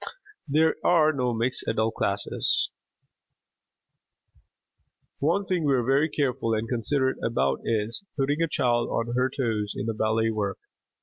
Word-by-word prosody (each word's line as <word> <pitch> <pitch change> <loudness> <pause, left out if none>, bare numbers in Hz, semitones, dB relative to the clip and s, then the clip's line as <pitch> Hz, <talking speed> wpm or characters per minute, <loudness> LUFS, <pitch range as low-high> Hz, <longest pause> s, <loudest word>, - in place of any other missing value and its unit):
There 155 +3 +3
are 155 -3 +4
no 125 -3 0
mixed 120 +2 -1
adult 110 0 0
classes. - - 0 2.5
One 170 +8 +1
thing 180 -3 0
we 140 -2 +3
are 125 - +1
very 135 +6 +2
careful 130 -6 0
and 110 +1 -2
considerate 130 +3 0
about 70 -13 +1
is, 115 - 0
putting 145 +3 0
a 165 - +3
child 120 -6 +1
on 115 +1 -2
her 125 +1 +2
toes 110 -6 -2
in 105 - -3
the 115 - -1
ballet 110 +1 +1
work. 100 -3 -2
125 Hz, 140 wpm, -26 LUFS, 115-145 Hz, 2.5 s, are